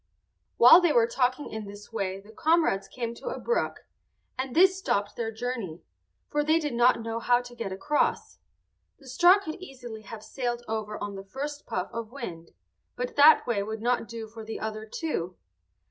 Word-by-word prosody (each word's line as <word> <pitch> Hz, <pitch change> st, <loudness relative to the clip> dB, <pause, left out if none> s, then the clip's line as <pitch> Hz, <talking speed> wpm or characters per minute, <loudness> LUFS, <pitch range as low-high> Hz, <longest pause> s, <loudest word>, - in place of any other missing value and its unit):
While 285 Hz, +9 st, +9 dB
they 345 Hz, -3 st, +3 dB
were 235 Hz, -5 st, +5 dB
talking 255 Hz, +4 st, -1 dB
in 220 Hz, -1 st, -5 dB
this 205 Hz, +2 st, -11 dB
way 195 Hz, -3 st, -2 dB
the 205 Hz, +2 st, -15 dB
comrades 310 Hz, -, +2 dB
came 235 Hz, -2 st, -4 dB
to 235 Hz, -, -11 dB
a -, -, -5 dB
brook, 475 Hz, -, -1 dB, 0.5 s
and 260 Hz, -1 st, -4 dB
this 375 Hz, +3 st, +6 dB
stopped 225 Hz, -, -1 dB
their 225 Hz, -1 st, -3 dB
journey, 220 Hz, -7 st, -5 dB, 0.4 s
for 295 Hz, 0 st, 0 dB
they 315 Hz, +2 st, +3 dB
did 300 Hz, -5 st, -2 dB
not 240 Hz, 0 st, +3 dB
know 225 Hz, 0 st, -3 dB
how 245 Hz, +1 st, +3 dB
to 245 Hz, 0 st, -11 dB
get 230 Hz, -5 st, -5 dB
across. 195 Hz, +11 st, -1 dB, 0.6 s
The 275 Hz, -, -18 dB
straw 350 Hz, +9 st, +6 dB
could 360 Hz, -3 st, -7 dB
easily 245 Hz, -9 st, -9 dB
have 215 Hz, +1 st, -10 dB
sailed 240 Hz, +1 st, -3 dB
over 215 Hz, -1 st, -3 dB
on 205 Hz, -1 st, -5 dB
the 195 Hz, 0 st, -7 dB
first 285 Hz, +8 st, -6 dB
puff 185 Hz, +1 st, -3 dB
of 230 Hz, -1 st, -5 dB
wind, 175 Hz, -11 st, -7 dB, 0.5 s
but 250 Hz, 0 st, -4 dB
that 295 Hz, +2 st, +7 dB
way 230 Hz, -5 st, 0 dB
would 220 Hz, +2 st, -5 dB
not 240 Hz, -1 st, +1 dB
do 230 Hz, -1 st, -7 dB
for 225 Hz, +1 st, -10 dB
the 220 Hz, +1 st, -6 dB
other 220 Hz, 0 st, -5 dB
two. 200 Hz, -, -3 dB
235 Hz, 190 wpm, -27 LUFS, 215-275 Hz, 0.6 s, While